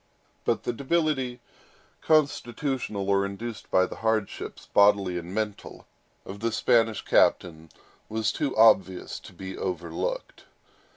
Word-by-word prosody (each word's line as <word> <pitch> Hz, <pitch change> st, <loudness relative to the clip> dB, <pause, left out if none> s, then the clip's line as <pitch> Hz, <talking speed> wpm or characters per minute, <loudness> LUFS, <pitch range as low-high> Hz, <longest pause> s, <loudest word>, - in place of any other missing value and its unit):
But -, -, 0 dB
the 120 Hz, -, -2 dB
debility, 135 Hz, -3 st, -1 dB, 0.6 s
constitutional 130 Hz, -8 st, 0 dB
or 100 Hz, 0 st, +3 dB
induced 105 Hz, +3 st, -6 dB
by 95 Hz, -, +4 dB
hardships, 110 Hz, 0 st, -3 dB
bodily 100 Hz, -3 st, +4 dB
and 85 Hz, +1 st, -9 dB
mental, 105 Hz, 0 st, -4 dB, 0.4 s
of 100 Hz, +1 st, -8 dB
the 115 Hz, +2 st, -1 dB
Spanish 115 Hz, -1 st, +2 dB
captain, 80 Hz, -2 st, +2 dB, 0.4 s
was 110 Hz, -1 st, 0 dB
too 140 Hz, -6 st, -2 dB
obvious 95 Hz, -4 st, +3 dB
to -, -, -13 dB
be 95 Hz, 0 st, -8 dB
overlooked. 85 Hz, -3 st, -4 dB
110 Hz, 115 wpm, -26 LUFS, 95-120 Hz, 0.6 s, by